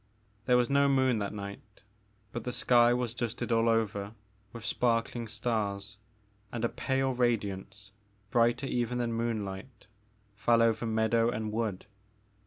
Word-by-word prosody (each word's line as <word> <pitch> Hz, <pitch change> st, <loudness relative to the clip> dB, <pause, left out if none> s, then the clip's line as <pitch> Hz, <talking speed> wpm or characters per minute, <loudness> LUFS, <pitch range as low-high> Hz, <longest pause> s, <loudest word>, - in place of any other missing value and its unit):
There 125 Hz, -1 st, +5 dB
was 120 Hz, -1 st, +3 dB
no 140 Hz, +1 st, +3 dB
moon 130 Hz, -4 st, +3 dB
that 100 Hz, -1 st, -2 dB
night 100 Hz, -1 st, -6 dB, 0.7 s
but 120 Hz, -, -5 dB
the 125 Hz, -, -3 dB
sky 120 Hz, -1 st, +4 dB
was 120 Hz, -1 st, 0 dB
dusted 120 Hz, 0 st, -3 dB
all 115 Hz, 0 st, +3 dB
over 105 Hz, -2 st, 0 dB, 0.4 s
with 115 Hz, -1 st, -9 dB
sparkling 115 Hz, -1 st, 0 dB
stars 105 Hz, -3 st, -2 dB, 0.5 s
and 120 Hz, -1 st, -2 dB
a -, -, +1 dB
pale 135 Hz, 0 st, 0 dB
radiance, 105 Hz, -4 st, -2 dB, 0.4 s
brighter 120 Hz, +2 st, +3 dB
even 125 Hz, -2 st, -1 dB
than 120 Hz, -1 st, -1 dB
moonlight, 110 Hz, -1 st, -4 dB, 0.5 s
fell 115 Hz, +3 st, +3 dB
over 115 Hz, 0 st, +1 dB
meadow 110 Hz, +1 st, +2 dB
and 110 Hz, -3 st, -3 dB
wood. 110 Hz, -4 st, -2 dB
115 Hz, 140 wpm, -30 LUFS, 105-120 Hz, 0.7 s, There